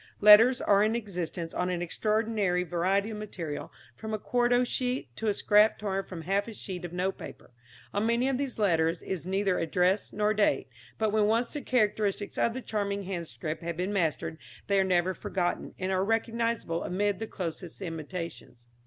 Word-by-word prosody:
Letters 215 +5 +8
are 200 -1 +4
in 220 +2 +2
existence 180 -6 -4
on 180 0 -1
an 175 -1 -1
extraordinary 210 -1 0
variety 185 +5 0
of 215 - -5
material, 175 -8 -5 0.2
from 220 - -4
a - - -2
quarto 245 +3 +2
sheet 250 - -2
to 225 - -2
a 210 - +3
scrap 210 +1 +4
torn 195 -2 -2
from 175 -4 -8
half 200 +4 0
a 230 - -6
sheet 185 -3 -6
of 175 - -5
note 185 +2 -2
paper. - - -10 0.4
On 205 +2 +1
many 235 +2 +2
of 270 -1 0
these 275 -3 -3
letters 165 -5 +2
is 185 -2 -4
neither 195 -1 +1
address 180 +4 +1
nor 210 +1 +1
date, 205 -12 +1 0.3
but 220 -1 +1
when 210 -1 +3
once 230 +3 +1
the 295 - -4
characteristics 210 -5 0
of 235 - +2
the 260 - -5
charming 200 -2 -2
handscript 165 -5 -5
have 170 -1 -4
been 185 +3 -1
mastered, 160 -3 -1 0.3
they 200 -1 +2
are - - +4
never 185 0 +2
forgotten, 180 -1 -2
and 185 0 -2
are 190 0 +2
recognisable 225 -4 0
amid 200 +1 0
the 225 - -4
closest 170 -2 -6
imitations. 165 -7 -6
200 Hz, 185 wpm, -29 LUFS, 175-215 Hz, 0.4 s, Letters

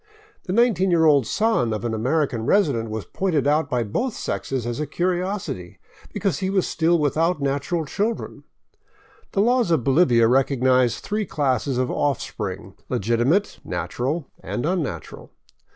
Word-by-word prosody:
The - - -4
nineteen 215 -5 +3
year 165 -2 +4
old 140 -6 +4
son 210 - +1
of 110 +2 -4
an 115 - -1
American 125 +1 0
resident 140 - +2
was 110 -1 -4
pointed 170 -8 -1
out 145 0 +2
by 125 -3 0
both 220 - -2
sexes 130 -4 -3
as 120 +3 -3
a 150 - -2
curiosity, 180 - -2 0.3
because 185 -8 -1
he 190 - -1
was 190 -2 +1
still 165 +1 +2
without 160 +3 +1
natural 140 +4 -1
children. 210 +9 -3 0.9
The 195 - +2
laws 240 -1 +2
of 160 -7 +2
Bolivia 130 -5 +4
recognize 130 -1 +2
three 210 -1 -2
classes 135 -3 0
of 130 -1 0
offspring, 145 -2 -3
— - - -40
legitimate, 120 - +1
natural, 140 +6 -3
and 120 - -4
unnatural. 150 - -3
145 Hz, 150 wpm, -23 LUFS, 125-180 Hz, 0.9 s, year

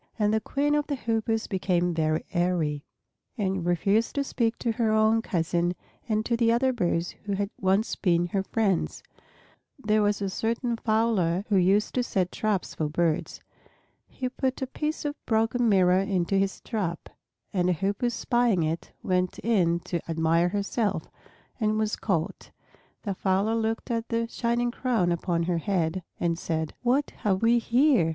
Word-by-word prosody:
And 210 -1 +2
the 220 - +2
Queen 285 +6 0
of 295 0 +1
the 285 - -1
Hoopoes 225 -2 -1
became 180 -2 0
very 155 -1 0
airy, 170 -5 0 0.5
and 190 -4 -1
refused 195 +6 +1
to 280 - +1
speak 235 -4 -1
to 235 - -1
her 225 -1 +1
own 220 +1 +4
cousin 175 -3 0 0.3
and 215 0 +1
to 235 - +1
the 230 -1 +3
other 255 +2 +2
birds 175 -6 0
who 200 - -1
had 200 +1 -2
once 195 +3 +1
been 175 -3 +2
her 195 +2 0
friends. 195 -2 -1 0.7
There 215 -5 +1
was 205 0 +1
a 200 - -1
certain 235 +3 -1
fowler 215 -6 +1
who 205 - +2
used 195 +3 +3
to 250 - +1
set 190 -7 -1
traps 210 -4 -1
for 155 -2 -2
birds. 160 0 -1 0.7
He 255 - -4
put 260 +1 -2
a - - +1
piece 305 +4 -3
of 290 0 -4
broken 225 +1 +2
mirror 185 -2 +4
into 195 -2 0
his 195 0 0
trap, 185 -7 -3 0.5
and 180 -2 +2
a - - +3
Hoopoe 200 +7 0
spying 240 -5 +1
it 160 +2 -3
went 180 -1 0
in 175 -7 +2
to 170 - -3
admire 165 +1 +2
herself, 205 +1 -1 0.5
and 215 -1 +1
was 215 -1 0
caught. 170 -6 -2 0.5
The 200 - -2
fowler 195 +3 +1
looked 225 +1 -1
at 230 0 -2
the 230 0 0
shining 240 +1 0
crown 235 -9 0
upon 170 0 0
her 170 0 0
head 180 -1 -1 0.2
and 170 -1 0
said, 160 -3 -2
"What 255 +4 +1
have 195 0 0
we 235 +1 +5
here! 240 - +3
205 Hz, 170 wpm, -27 LUFS, 175-230 Hz, 0.7 s, we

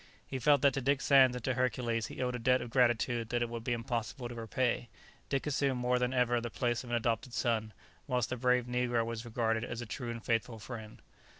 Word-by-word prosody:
He 135 - -4
felt 145 +2 +4
that 140 -2 +5
to 135 - -2
Dick 140 +2 +2
Sands 135 -3 +5
and 125 - -6
to 130 - +1
Hercules 120 -3 0
he - - -4
owed 125 0 -1
a 125 - -3
debt 125 +2 +3
of 120 - -7
gratitude 120 -2 +2
that 120 0 +1
it 120 - -3
would 115 -1 -5
be 120 - -2
impossible 120 +1 -3
to - - -6
repay; 120 +1 -1 0.4
Dick 135 -1 0
assumed 140 -3 0
more 125 0 +2
than 125 0 +1
ever 120 -2 +2
the 120 - -4
place 120 +1 -1
of 125 - -10
an 120 - 0
adopted 115 +1 -1
son, 110 -2 0 0.4
whilst 125 -4 0
the - - 0
brave 125 0 +2
negro 125 -1 0
was 115 0 -5
regarded 115 -1 0
as 120 -1 -5
a 120 - -4
true 120 +3 -5
and 115 -1 -6
faithful 115 0 0
friend. 110 0 -9
120 Hz, 235 wpm, -32 LUFS, 115-125 Hz, 0.4 s, that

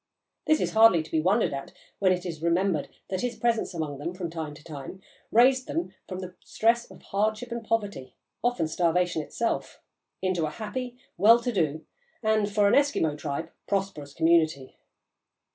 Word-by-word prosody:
This 310 - +4
is - - 0
hardly 220 -7 +6
to 160 - -14
be 160 - +2
wondered 195 +1 +2
at, 135 0 -6 0.3
when 190 -2 +4
it 180 0 -1
is 165 -3 -5
remembered 170 -2 +1 0.2
that 185 - -1
his 245 -1 -2
presence 230 -4 0
among 150 -4 -3
them, 170 +5 -4
from 175 -3 -4
time 160 -3 -5
to 150 - -15
time, 150 +4 -8 0.3
raised 255 +3 +5
them 335 +2 -3
from 185 -1 -5
the 185 -1 -7
stress 235 +2 +1
of - - -15
hardship 215 +4 -1
and 235 -1 -4
poverty, 205 - -2 0.3
often 240 -10 +1
starvation 175 +1 +1
itself, 230 +9 -3 0.4
into 180 -4 0
a - - -3
happy, 245 +8 -5 0.2
well 225 +6 +7
to 245 - -1
do, 160 -7 -1 0.4
and, 215 -1 +2
for 205 0 +3
an - - +3
Eskimo 275 - +3
tribe, 150 +2 -4 0.2
prosperous 190 -8 -2
community. 160 -5 +2
185 Hz, 175 wpm, -27 LUFS, 160-225 Hz, 0.4 s, well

